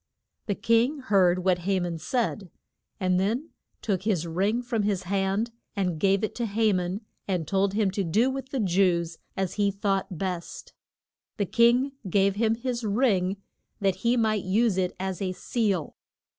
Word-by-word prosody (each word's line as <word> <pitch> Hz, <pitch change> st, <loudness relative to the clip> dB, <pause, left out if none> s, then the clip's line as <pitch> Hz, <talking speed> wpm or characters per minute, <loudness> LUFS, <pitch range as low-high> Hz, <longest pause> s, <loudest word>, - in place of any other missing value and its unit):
The 200 Hz, -, 0 dB
king 230 Hz, +8 st, +2 dB
heard 185 Hz, -8 st, +2 dB
what 185 Hz, -2 st, +3 dB
Ha 190 Hz, +2 st, 0 dB
man 175 Hz, -2 st, -3 dB
said, 210 Hz, +2 st, -2 dB, 0.5 s
and 185 Hz, -2 st, +2 dB
then 235 Hz, -, -1 dB, 0.3 s
took 195 Hz, -4 st, 0 dB
his 190 Hz, -5 st, 0 dB
ring 195 Hz, +8 st, 0 dB
from 235 Hz, -2 st, -1 dB
his 200 Hz, -2 st, 0 dB
hand 195 Hz, +4 st, 0 dB, 0.2 s
and 180 Hz, -5 st, -1 dB
gave 195 Hz, +2 st, +2 dB
it 215 Hz, -, -1 dB
to 235 Hz, -1 st, -1 dB
Ha 215 Hz, 0 st, +2 dB
man, 180 Hz, +3 st, -2 dB, 0.3 s
and 180 Hz, -5 st, -1 dB
told 195 Hz, +1 st, +1 dB
him 210 Hz, -3 st, +2 dB
to 195 Hz, +1 st, -1 dB
do 220 Hz, +10 st, +2 dB
with 265 Hz, -1 st, -5 dB
the 265 Hz, -, -2 dB
Jews 175 Hz, -4 st, +1 dB, 0.2 s
as 190 Hz, -2 st, -1 dB
he 200 Hz, -, +4 dB
thought 195 Hz, -2 st, -1 dB
best. 180 Hz, -2 st, -5 dB, 0.6 s
The 205 Hz, -, +1 dB
king 240 Hz, +6 st, +3 dB, 0.2 s
gave 195 Hz, +1 st, +3 dB
him 225 Hz, 0 st, +2 dB
his 240 Hz, 0 st, -3 dB
ring 200 Hz, -4 st, +1 dB, 0.4 s
that 195 Hz, -2 st, +1 dB
he 235 Hz, +5 st, +1 dB
might 215 Hz, -3 st, +1 dB
use 210 Hz, +2 st, +2 dB
it 185 Hz, -1 st, -1 dB
as 190 Hz, -1 st, -3 dB
a 185 Hz, -1 st, -1 dB
seal. 200 Hz, -6 st, -1 dB
195 Hz, 170 wpm, -27 LUFS, 185-225 Hz, 0.6 s, he